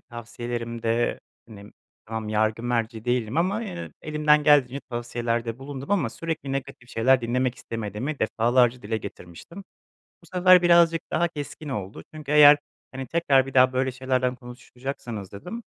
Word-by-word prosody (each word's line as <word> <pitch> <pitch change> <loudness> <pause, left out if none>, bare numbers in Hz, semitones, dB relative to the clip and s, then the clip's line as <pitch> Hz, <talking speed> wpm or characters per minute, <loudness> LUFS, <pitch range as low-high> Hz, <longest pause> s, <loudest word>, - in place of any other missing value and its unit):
tavsiyelerimde, 120 -1 -3 0.3
hani, 105 -1 -12 0.4
tamam, 110 -1 -5
yargı 110 +1 0
merci 115 -2 -2
değilim 120 0 -1
ama 195 +7 +1
yine 180 -5 -6
elimden 150 -1 +3
geldiğince 140 -2 +4
tavsiyelerde 120 -1 -3
bulundum 135 +3 -8
ama 205 -3 +1
sürekli 160 -4 -4
negatif 130 -2 -6
şeyler 130 +3 +3
dinlemek 125 +1 0
istemediğimi 115 +6 -5
defalarca 120 +2 +2
dile 110 +2 -2
getirmiştim. 100 - -10 0.6
Bu - - -18
sefer 180 0 +6
birazcık 170 -1 +5
daha 170 +2 +1
keskin 150 -1 -7
oldu 105 -6 -5
çünkü, 150 -2 -5
"Eğer, 150 0 +8 0.3
hani, 135 0 -6
tekrar 140 -4 +2
bir 135 - -9
daha 130 0 +5
böyle 130 0 0
şeylerden 130 -1 -1
konuşacaksanız" 125 -4 -8
dedim, 180 - -7
125 Hz, 140 wpm, -25 LUFS, 115-150 Hz, 0.6 s, Eğer